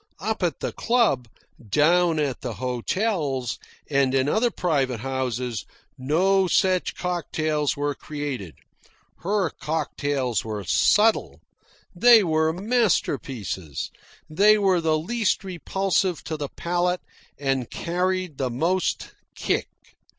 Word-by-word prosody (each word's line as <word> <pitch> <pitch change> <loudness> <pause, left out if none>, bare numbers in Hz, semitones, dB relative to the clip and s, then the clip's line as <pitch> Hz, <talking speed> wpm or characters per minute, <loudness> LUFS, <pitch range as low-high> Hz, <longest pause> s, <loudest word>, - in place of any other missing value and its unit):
Up 220 +3 -2
at 170 -6 -1
the - - -2
club, 230 - +1 0.4
down 165 - +3
at 145 -4 -1
the 125 -3 -4
hotels, 130 - -1 0.3
and 135 -2 +2
in 130 0 +2
other 220 +10 +2
private 135 - -1
houses, 125 -3 -2 0.3
no 185 +8 +2
such 185 0 +2
cocktails 155 -5 -1
were 145 0 -1
created. 140 - -6 0.6
Her 195 0 0
cocktails 145 -5 -2
were 105 -2 -4
subtle. 215 - +3 0.6
They 230 +3 +7
were 160 -2 +2
masterpieces. 145 - -1 0.4
They 205 +7 +5
were 190 -4 +2
the 160 -1 +2
least 205 +5 0
repulsive 190 0 -1
to 160 - -4
the 145 -2 -4
palate 175 +1 -1 0.4
and 135 -3 -1
carried 180 -2 -2
the 130 -2 0
most 170 +10 -1 0.2
"kick." - - -1
155 Hz, 115 wpm, -24 LUFS, 135-185 Hz, 0.6 s, They